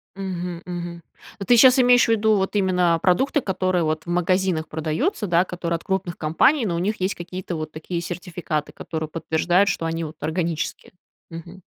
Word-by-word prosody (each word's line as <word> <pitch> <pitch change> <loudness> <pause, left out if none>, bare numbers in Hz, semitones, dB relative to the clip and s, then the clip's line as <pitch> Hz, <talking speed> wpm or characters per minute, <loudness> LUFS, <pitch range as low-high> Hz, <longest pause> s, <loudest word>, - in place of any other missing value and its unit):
Мгм, 180 -3 -5
мгм. 175 -1 -6 0.4
Ну, 195 - -5
ты 245 - +5
щас 255 +3 +7
имеешь 245 -1 +5
ввиду 220 -1 +3
вот 195 +1 -1
именно, 180 -3 +2
а, - - -3
продукты, 265 - +2
которые 185 -3 0
вот 155 0 -1
в - - -8
магазинах 180 -2 +1
продаются, 160 - -2
да, 175 +1 +3
которые 170 -2 -3
от 165 - -6
крупных 190 -3 -2
компаний, 220 - +2
но 170 -4 -1
у - - -1
них 205 +3 -1
есть 185 +2 -1
какие-то 175 0 -6
вот 155 -1 -5
такие 170 +2 -5
сертификаты, 170 -3 -4
которые 160 -1 -5
подтверждают, 170 +4 +1
что 165 -2 -2
они 165 0 -2
вот 155 0 -7
органические. 165 +1 -3 0.4
Мгм. 170 +3 -10
175 Hz, 185 wpm, -23 LUFS, 165-190 Hz, 0.4 s, щас